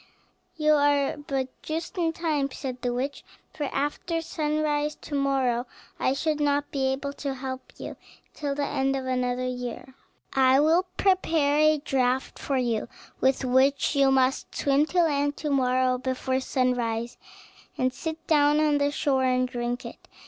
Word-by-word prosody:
"You 305 Hz, -1 st, +4 dB
are 285 Hz, -1 st, +3 dB
but 275 Hz, -3 st, -3 dB
just 325 Hz, +5 st, -4 dB
in 335 Hz, -3 st, +1 dB
time," 310 Hz, -4 st, -1 dB
said 255 Hz, -2 st, -6 dB
the 245 Hz, -, -1 dB
witch; 265 Hz, +4 st, -3 dB, 0.3 s
"for 295 Hz, -, -3 dB
after 295 Hz, +5 st, -2 dB
sunrise 300 Hz, -2 st, -1 dB
to -, -, -9 dB
morrow 265 Hz, -3 st, +1 dB, 0.3 s
I 260 Hz, -, +2 dB
should 305 Hz, +2 st, -1 dB
not 290 Hz, 0 st, +1 dB
be 270 Hz, -2 st, 0 dB
able 275 Hz, +1 st, -2 dB
to 275 Hz, -2 st, -2 dB
help 260 Hz, 0 st, -6 dB
you -, -, -7 dB, 0.4 s
till 285 Hz, -2 st, -3 dB
the 285 Hz, 0 st, -1 dB
end 270 Hz, 0 st, 0 dB
of 265 Hz, -1 st, -3 dB
another 250 Hz, -1 st, -1 dB
year. 250 Hz, +1 st, -5 dB, 0.4 s
I 265 Hz, 0 st, +5 dB
will 330 Hz, +5 st, +3 dB
prepare 325 Hz, -7 st, +2 dB
a 310 Hz, 0 st, +5 dB
draught 265 Hz, -3 st, -1 dB
for 275 Hz, -, -1 dB
you, 235 Hz, -4 st, 0 dB, 0.3 s
with 265 Hz, 0 st, +2 dB
which 265 Hz, +3 st, +3 dB
you 275 Hz, -1 st, +5 dB
must 265 Hz, 0 st, +1 dB
swim 285 Hz, +2 st, +2 dB
to 355 Hz, +1 st, +2 dB
land 290 Hz, -2 st, 0 dB
tomorrow 255 Hz, -3 st, +1 dB
before 260 Hz, 0 st, -1 dB
sunrise, 245 Hz, -3 st, -1 dB, 0.6 s
and 255 Hz, 0 st, +1 dB
sit 320 Hz, +2 st, -6 dB
down 295 Hz, -1 st, +4 dB
on 300 Hz, -1 st, +3 dB
the 285 Hz, 0 st, +2 dB
shore 270 Hz, -2 st, +1 dB
and 255 Hz, 0 st, +2 dB
drink 245 Hz, 0 st, -3 dB
it. -, -, -10 dB
275 Hz, 160 wpm, -26 LUFS, 255-295 Hz, 0.6 s, I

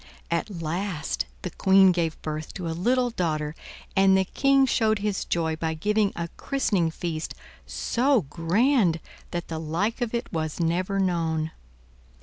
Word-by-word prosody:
At 170 Hz, +5 st, 0 dB
last 170 Hz, 0 st, -2 dB, 0.2 s
the 180 Hz, -, -3 dB
Queen 190 Hz, +1 st, +5 dB
gave 170 Hz, -3 st, -1 dB
birth 155 Hz, 0 st, -5 dB
to 180 Hz, -3 st, -4 dB
a -, -, -1 dB
little 245 Hz, +8 st, +1 dB
daughter 155 Hz, -7 st, -1 dB, 0.4 s
and 195 Hz, 0 st, +5 dB
the 190 Hz, -, +2 dB
King 275 Hz, +6 st, +3 dB
showed 220 Hz, -4 st, +2 dB
his 205 Hz, -1 st, -2 dB
joy 160 Hz, -2 st, 0 dB
by 160 Hz, 0 st, -2 dB
giving 210 Hz, +4 st, +1 dB
a 170 Hz, -, -3 dB
christening 205 Hz, -, +1 dB
feast 160 Hz, -1 st, -4 dB, 0.3 s
so 255 Hz, -1 st, +1 dB
grand 175 Hz, -, +2 dB, 0.3 s
that 175 Hz, 0 st, -4 dB
the 160 Hz, -1 st, -4 dB
like 175 Hz, +10 st, -1 dB
of 240 Hz, -1 st, -1 dB
it 235 Hz, -, -4 dB
was 155 Hz, -1 st, -2 dB
never 180 Hz, +4 st, 0 dB
known. 165 Hz, -4 st, 0 dB
180 Hz, 150 wpm, -26 LUFS, 160-210 Hz, 0.4 s, Queen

